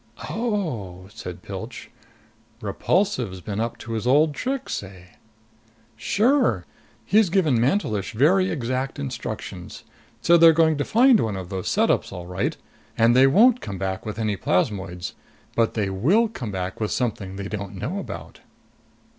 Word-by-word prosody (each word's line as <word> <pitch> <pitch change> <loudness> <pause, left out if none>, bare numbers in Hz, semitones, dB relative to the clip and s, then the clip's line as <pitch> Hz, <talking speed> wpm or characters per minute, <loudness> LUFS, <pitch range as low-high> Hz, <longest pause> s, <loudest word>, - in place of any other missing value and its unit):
"Oh!" 140 - -3
said 90 -6 -8
Pilch. - - -8 0.7
"Repulsive's 130 - 0
been 100 +3 -5
up 115 +1 -2
to 115 - -9
his 115 +1 -2
old 150 +4 +4
tricks, 265 - -3
eh?" 95 -2 -13 0.9
"Sure. 210 - +2 0.4
He's 210 -1 +4
given 160 - +2
Mantelish 120 - 0
very 185 - +3
exact 130 -1 -2
instructions. 70 - -6 0.4
So 170 0 +5
they're 165 0 +8
going 160 -1 +3
to - - +2
find 245 0 +5
one 110 - -1
of 90 -2 -7
those 95 -2 -4
setups, - - +1
all 90 -1 -7
right. 90 +1 -2 0.4
And 115 +1 +4
they 130 +1 +7
won't 230 - +5
come 95 - -5
back 95 0 -3
with 105 -1 -6
any 110 -3 -1
plasmoids. 90 -1 -1 0.4
But 115 -1 +1
they 100 -3 0
will 175 - +3
come 125 - -6
back 90 -1 -4
with 105 - 0
something 105 -6 -2
they 100 0 -5
don't 100 -2 -5
know 130 - -3
about." - - -8
115 Hz, 150 wpm, -24 LUFS, -, 0.9 s, they're